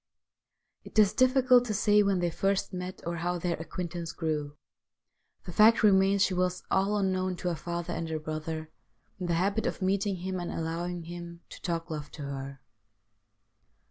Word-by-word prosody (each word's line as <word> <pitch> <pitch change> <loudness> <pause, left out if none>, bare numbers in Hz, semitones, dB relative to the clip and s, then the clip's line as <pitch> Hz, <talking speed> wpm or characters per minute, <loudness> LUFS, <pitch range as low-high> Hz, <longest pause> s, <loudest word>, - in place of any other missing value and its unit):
It - - -11
is 210 -1 +6
difficult 255 0 +5
to 215 -3 -2
say 210 0 +4
when 195 -3 +2
they 175 -1 +1
first 195 +3 0
met 180 0 -6
or 170 0 -2
how 175 +2 -1
their 175 0 -1
acquaintance 170 0 -5
grew; 150 -3 -3 0.9
the 175 - -8
fact 220 +4 +6
remains 195 -1 +5
she 190 - +1
was, 180 0 0
all 195 +2 +2
unknown 185 -2 0
to 180 +1 -2
her 170 - -1
father 170 +1 -4
and 165 -1 -3
her 160 - -1
brother, 155 +1 -5 0.5
in 180 - -3
the 170 - +1
habit 200 +5 +1
of - - -3
meeting 195 +1 +1
him 185 +1 -4
and 175 - -4
allowing 170 +2 -3
him 170 0 -8
to - - -11
talk 165 -1 -3
love 150 -1 -5
to 150 - -7
her. 135 -1 -6
180 Hz, 175 wpm, -29 LUFS, 165-195 Hz, 0.9 s, is